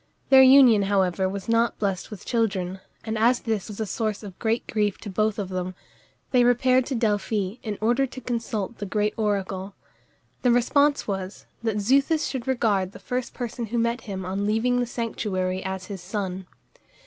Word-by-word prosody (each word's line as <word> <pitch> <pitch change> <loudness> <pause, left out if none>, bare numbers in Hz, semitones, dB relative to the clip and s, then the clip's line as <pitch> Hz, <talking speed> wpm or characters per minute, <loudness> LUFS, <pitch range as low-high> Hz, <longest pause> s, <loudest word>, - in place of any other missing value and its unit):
Their 265 0 +9
union, 260 -5 +7
however, 190 -1 +2
was 195 0 -6
not 230 +1 +2
blest 195 -3 -2
with 210 -4 -10
children, 195 -6 -1 0.2
and 220 -1 -3
as 240 +3 +3
this 220 -5 -2
was 210 -1 -8
a 220 - 0
source 215 +1 -2
of 195 -3 -10
great 225 +1 0
grief 210 -2 0
to 205 - -6
both 215 +2 0
of 200 -3 -3
them, 185 0 -4 0.6
they 250 -2 +5
repaired 255 +1 +3
to 275 - -2
Delphi 210 -2 0
in 215 -5 -4
order 240 +5 +2
to 260 - -9
consult 230 -3 -3
the 210 +1 -1
oracle. 195 -2 -2 0.7
The 250 - +3
response 285 +4 +3
was, 190 -1 -4 0.2
that 220 -2 -1
Xuthus 275 +8 +2
should 260 -2 -4
regard 205 -7 +1
the - - -9
first 250 0 -4
person 240 -1 -4
who 235 +3 -3
met 235 +1 0
him 190 -3 -6
on 195 +2 -2
leaving 240 +4 +2
the 245 - 0
sanctuary 190 -6 -2
as 190 -1 -4
his 195 -2 -7
son. 190 -1 -4
215 Hz, 180 wpm, -25 LUFS, 195-240 Hz, 0.7 s, Their